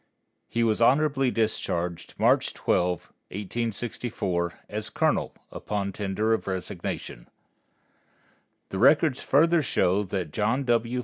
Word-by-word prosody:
He 115 - 0
was 110 0 +1
honorably 135 +1 +4
discharged 90 -7 -2
March - - +3
12, 90 -1 0 0.2
1864, 105 -3 -3
as - - -4
colonel, - - +1 0.2
upon 100 -2 -3
tender 105 +2 0
of 110 - -2
resignation. 90 -9 -5 1.4
The 95 - -4
records 145 +1 +4
further 165 +4 +4
show 100 -7 +2
that 95 -5 -3
John 110 - 0
W. 120 0 +1
110 Hz, 110 wpm, -26 LUFS, 95-125 Hz, 1.4 s, honorably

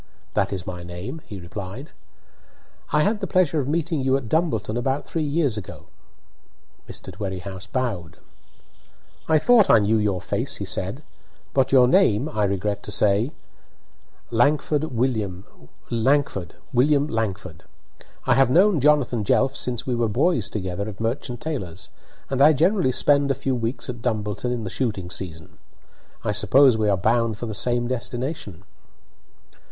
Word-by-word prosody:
"That - - +1
is 95 -3 -4
my 90 -1 -6
name," 90 - -7
he 100 -3 -8
replied. 95 - -8 1.0
"I 150 - +3
had 210 +4 +1
the - - -3
pleasure 170 -5 +2
of 135 - -2
meeting 160 0 -1
you 130 +1 +2
at 130 -4 -7
Dumbleton 115 - 0
about 130 +4 -1
three 165 - -3
years 145 -6 0
ago." 95 - -10 1.1
Mr. - - -7
Dwerrihouse 95 -1 -6
bowed. 100 -10 -3 1.1
"I 160 - +4
thought 220 +5 +5
I - - +8
knew 110 +1 +2
your 100 -3 0
face," - - -2
he - - -4
said; - - -2 0.5
"but 135 -2 +2
your 130 -2 +6
name, 135 - +3
I 105 -9 0
regret 100 +1 -2
to 105 - -7
say 105 +6 +3 0.5
" - - -36
"Langford 150 +2 +2
William 110 - -2 0.5
Langford. 115 - 0 1.7
I 130 - +4
have 135 0 +4
known 185 +4 +4
Jonathan 135 -6 +3
Jelf 130 +6 +2
since 120 -1 -1
we 130 - -1
were 120 -2 0
boys 135 - +1
together 100 0 -4
at 100 - -10
Merchant 120 +2 -3
Taylor's, 95 - -5 0.4
and 135 0 -1
I 150 +2 +7
generally 170 0 +2
spend 140 +2 +3
a 135 - +2
few 135 - -2
weeks 120 +1 -2
at 120 -3 -6
Dumbleton 110 0 -2
in 120 -2 -3
the 95 - -5
shooting 105 -9 -2
season. 80 -5 -6 0.6
I - - 0
suppose 115 +5 +5
we 110 -1 +1
are 100 - +2
bound 115 +2 +1
for 120 - -5
the 110 - -4
same 120 +3 0
destination?" 125 - -4
120 Hz, 155 wpm, -23 LUFS, 105-140 Hz, 1.7 s, I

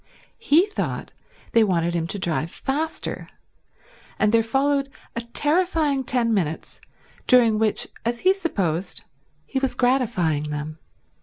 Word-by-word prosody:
He 345 -5 +4
thought 420 - -4 0.4
they 230 - +5
wanted 170 -4 +1
him 165 -1 -1
to 200 - -4
drive 165 -3 -1
faster; 300 - -3 0.9
and 210 - +2
there 230 0 +5
followed 275 +4 +1 0.3
a 235 - -2
terrifying 295 +2 +1
ten 240 -3 +1
minutes 165 -6 -2 0.5
during 235 -4 +5
which, 220 -1 +1 0.2
as 235 +1 -2
he 375 +1 +5
supposed, 195 - -2 0.4
he 270 - -2
was 270 -1 -1
gratifying 185 - +1
them. 150 +1 -5
235 Hz, 130 wpm, -23 LUFS, 175-280 Hz, 0.9 s, they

